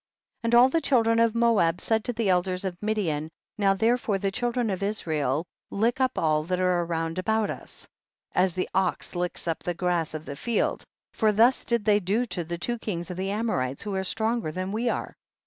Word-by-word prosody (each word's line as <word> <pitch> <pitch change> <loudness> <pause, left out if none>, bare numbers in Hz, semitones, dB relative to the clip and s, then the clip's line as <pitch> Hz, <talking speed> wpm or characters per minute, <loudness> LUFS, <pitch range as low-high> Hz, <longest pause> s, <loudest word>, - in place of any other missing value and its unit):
41. 230 - -2
And 235 - +4
all 255 +2 +7
the 325 +5 +1
children 230 -5 +3
of 230 -1 +3
Moab 220 -8 +3
said 220 -1 +1
to 245 - -1
the 230 -2 -1
elders 180 +1 +1
of 185 -2 -2
Midian, 180 -8 -1 0.3
now 195 -1 +3
therefore 225 -1 +1
the 195 0 -1
children 240 +1 0
of 190 - -3
Israel 160 -7 -1 0.2
lick 230 +5 0
up 260 - +1
all 155 -1 +2
that 180 +1 -1
are 180 -1 +2
round 165 0 -2
about 220 +2 +1
us, - - -9 0.4
as 180 -1 +2
the 185 - -1
ox 190 -2 0
licks 175 0 -3
up 165 - -1
the 175 - -3
grass 170 -3 -1
of 155 0 -6
the 140 - -6
field, 235 +9 -1 0.3
for 220 -2 +3
thus 230 +5 +4
did 235 -3 0
they 210 -1 +4
do 210 +6 0
to 180 -7 -4
the 170 +1 -5
two 240 +7 -2
kings 175 -5 -4
of 180 - -6
the 190 +1 -2
Amorites 195 - -1
who 210 -2 -4
are 190 0 -1
stronger 220 -2 -1
than 185 +3 -4
we 230 +3 0
are. - - -3
195 Hz, 215 wpm, -26 LUFS, 175-225 Hz, 0.4 s, all